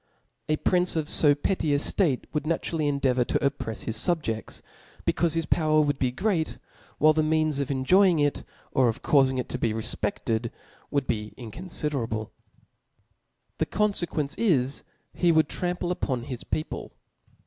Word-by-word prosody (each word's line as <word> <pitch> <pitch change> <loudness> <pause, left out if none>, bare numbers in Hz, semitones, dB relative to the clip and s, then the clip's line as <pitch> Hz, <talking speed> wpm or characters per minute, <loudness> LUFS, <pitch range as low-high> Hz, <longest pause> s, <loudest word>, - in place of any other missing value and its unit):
A 155 - +3
prince 180 +3 +2
of 155 -2 -1 0.2
(o 145 -2 +6
petty 150 -1 0
a - - +3
ftatc 145 -2 +1
would 150 -1 -2
naturally 160 -1 -1
endeavour 135 -3 +2
to - - 0
opprefs 140 -6 -2
his 115 - -2
fubjefts, 150 -11 -2 0.4
becaufe 165 -2 +1
his 165 -1 0
power 155 -1 +2
would 145 -2 +1
be 130 - +2
great. 170 - -1 0.4
While 155 +1 +5
the 155 - +2
means 155 -2 +1
of 140 0 -2
enjoying 170 +7 +4
it 145 -1 0 0.3
or 130 -2 +3
of 115 +4 -5
caufing 135 -2 +3
it 125 - -3
to 125 - -3
be 115 -3 0
refpefted, 110 +1 -2 0.4
would 140 -2 0
be 105 -3 -3
incoiifiderable. 125 - -4 1.3
The - - +1
con 210 +1 +1
fequence 155 -6 -2
is, 140 - +1 0.3
he 175 -1 +3
would 160 -2 +4
trample 180 +1 -2
upon 130 -9 -2
his 125 -2 -6
people. 155 - -4
145 Hz, 160 wpm, -26 LUFS, 130-165 Hz, 1.3 s, o